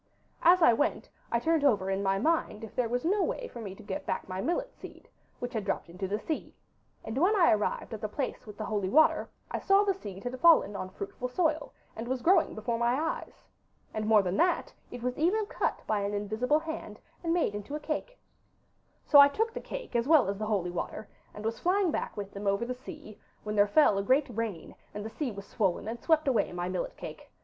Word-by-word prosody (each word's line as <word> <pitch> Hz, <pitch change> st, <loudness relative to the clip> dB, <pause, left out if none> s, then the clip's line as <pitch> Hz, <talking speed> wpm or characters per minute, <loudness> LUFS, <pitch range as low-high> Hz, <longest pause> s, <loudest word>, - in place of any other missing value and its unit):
As 350 Hz, +1 st, +6 dB
I 240 Hz, -, +7 dB
went 290 Hz, +8 st, -1 dB, 0.2 s
I 235 Hz, -, +3 dB
turned 320 Hz, +5 st, +1 dB
over 200 Hz, -9 st, +3 dB
in 195 Hz, +1 st, 0 dB
my 195 Hz, 0 st, +1 dB
mind 245 Hz, -4 st, 0 dB
if 220 Hz, -, -9 dB
there 245 Hz, -2 st, 0 dB
was 245 Hz, +3 st, -1 dB
no 400 Hz, +4 st, +2 dB
way -, -, -2 dB
for 235 Hz, -, -9 dB
me 195 Hz, -3 st, -6 dB
to -, -, -13 dB
get 200 Hz, -2 st, -5 dB
back -, -, -2 dB
my 185 Hz, 0 st, -4 dB
millet -, -, -1 dB
seed, -, -, -12 dB, 0.3 s
which 245 Hz, +1 st, -5 dB
had 220 Hz, -3 st, -2 dB
dropped 195 Hz, -3 st, -3 dB
into 185 Hz, +2 st, -4 dB
the 205 Hz, +2 st, -1 dB
sea, 310 Hz, +8 st, -5 dB, 0.5 s
and 220 Hz, -, -5 dB
when 380 Hz, +7 st, +4 dB
I 355 Hz, -5 st, +5 dB
arrived 215 Hz, +2 st, -1 dB
at 220 Hz, -, -6 dB
the 215 Hz, -, -3 dB
place 255 Hz, 0 st, -4 dB
with 210 Hz, -1 st, -10 dB
the 215 Hz, -, -4 dB
holy 205 Hz, -3 st, -1 dB
water 315 Hz, +8 st, +4 dB, 0.2 s
I -, -, -1 dB
saw 390 Hz, +1 st, +4 dB
the 400 Hz, -1 st, +2 dB
seed 200 Hz, -, -9 dB
had 250 Hz, +1 st, -4 dB
fallen 315 Hz, -11 st, +5 dB
on 185 Hz, -, -4 dB
fruitful 200 Hz, +6 st, -5 dB
soil, 310 Hz, +3 st, 0 dB, 0.2 s
and 225 Hz, +2 st, -5 dB
was 255 Hz, -1 st, -2 dB
growing 375 Hz, +3 st, +4 dB
before 230 Hz, +2 st, -2 dB
my 240 Hz, +3 st, +2 dB
eyes. 325 Hz, +1 st, -4 dB, 0.5 s
And 215 Hz, 0 st, -2 dB
more 215 Hz, -2 st, +5 dB
than 185 Hz, +1 st, -1 dB
that, 355 Hz, 0 st, +1 dB, 0.2 s
it 240 Hz, -, -8 dB
was 250 Hz, +2 st, -2 dB
even 400 Hz, +7 st, +2 dB
cut -, -, -2 dB
by 215 Hz, -1 st, 0 dB
an 200 Hz, +1 st, -2 dB
invisible 215 Hz, +8 st, +1 dB
hand, 320 Hz, 0 st, -6 dB, 0.2 s
and 330 Hz, -, 0 dB
made 335 Hz, -11 st, +1 dB
into 205 Hz, +8 st, -5 dB
a -, -, -3 dB
cake. 320 Hz, +12 st, -4 dB, 0.9 s
'So 290 Hz, -, +7 dB
I 280 Hz, -, +10 dB
took 445 Hz, +10 st, -1 dB
the -, -, -5 dB
cake -, -, -7 dB
as 235 Hz, +1 st, +1 dB
well 305 Hz, -7 st, +6 dB
as 200 Hz, 0 st, -3 dB
the 215 Hz, -, -2 dB
holy 190 Hz, -5 st, 0 dB
water, 190 Hz, +4 st, -5 dB, 0.2 s
and 210 Hz, -, -9 dB
was 225 Hz, 0 st, -2 dB
flying 370 Hz, 0 st, +2 dB
back -, -, -3 dB
with 200 Hz, -1 st, -5 dB
them 200 Hz, 0 st, -5 dB
over 200 Hz, +4 st, +1 dB
the 250 Hz, -, -3 dB
sea, 255 Hz, -, -11 dB, 0.2 s
when 210 Hz, 0 st, -3 dB
there 205 Hz, 0 st, +5 dB
fell 205 Hz, -3 st, +4 dB
a -, -, -1 dB
great 260 Hz, +2 st, +2 dB
rain, 215 Hz, -7 st, -4 dB, 0.2 s
and 210 Hz, 0 st, -5 dB
the 220 Hz, -, -5 dB
sea 290 Hz, +1 st, -3 dB
was 200 Hz, -1 st, -8 dB
swollen, 200 Hz, -2 st, -1 dB
and 235 Hz, +2 st, -4 dB
swept 315 Hz, -3 st, +2 dB
away 255 Hz, -4 st, +2 dB
my 175 Hz, 0 st, -3 dB
millet 185 Hz, -, -3 dB
cake. -, -, -9 dB
235 Hz, 235 wpm, -29 LUFS, 205-315 Hz, 0.9 s, I